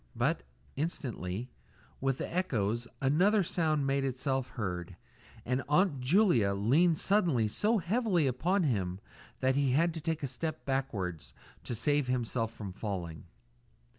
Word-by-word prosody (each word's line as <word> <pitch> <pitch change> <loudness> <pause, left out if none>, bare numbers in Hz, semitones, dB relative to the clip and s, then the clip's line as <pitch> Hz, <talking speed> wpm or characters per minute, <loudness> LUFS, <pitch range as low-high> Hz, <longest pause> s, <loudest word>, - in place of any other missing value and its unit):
But, - - +1 0.3
instantly, 125 - -3 0.5
with 135 -1 0
the - - -5
echoes, 120 - 0 0.2
another 190 +10 +4
sound 155 -4 0
made 135 0 +1
itself 130 0 -1
heard, 90 -4 -3 0.5
and 125 +2 0
Aunt 150 -2 +3
Julia 130 - +4
leaned 150 - +3
suddenly 170 - +2
so 215 - +1
heavily 195 - +1
upon 175 +10 +1
him 95 - -1 0.4
that 130 0 +2
he 140 -2 +2
had 165 +4 +3
to 160 - -6
take 160 0 -2
a - - 0
step 155 +5 -4
backwards 105 - -3 0.3
to 120 - -3
save 145 +4 +1
himself 120 -2 -1
from 100 -4 -7
falling. 90 -7 -5
135 Hz, 135 wpm, -31 LUFS, 115-165 Hz, 0.5 s, another